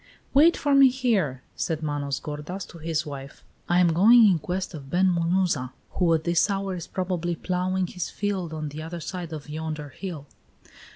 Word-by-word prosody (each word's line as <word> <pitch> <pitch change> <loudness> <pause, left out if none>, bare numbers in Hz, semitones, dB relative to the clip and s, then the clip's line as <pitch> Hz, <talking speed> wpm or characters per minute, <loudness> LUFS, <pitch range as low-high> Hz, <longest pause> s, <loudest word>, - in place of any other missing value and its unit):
"Wait 315 +5 +6
for 285 -1 +1
me 275 -1 +8
here," 210 - 0
said 160 -1 -2
Manos 145 -2 -2
gordas 150 +6 -6
to 170 - -12
his 160 0 -1
wife. 140 -2 -8 0.3
"I 175 +1 +4
am 175 -2 +4
going 225 +7 +7
in 185 -5 +4
quest 185 +4 -3
of 140 -4 -9
Ben 185 +5 +3
Munuza, 170 -6 0 0.2
who 175 -3 +1
at 160 - -2
this 170 +4 +2
hour 195 -1 -1
is 175 -3 -6
probably 175 -2 -2
ploughing 185 +1 -1
his 180 -1 -5
fields 195 -5 -2
on 155 -1 -4
the 150 +2 -7
other 165 +2 -6
side 175 +1 -6
of 155 -2 -7
yonder 155 -1 -5
hill." 155 0 -7
170 Hz, 185 wpm, -25 LUFS, 155-190 Hz, 0.3 s, me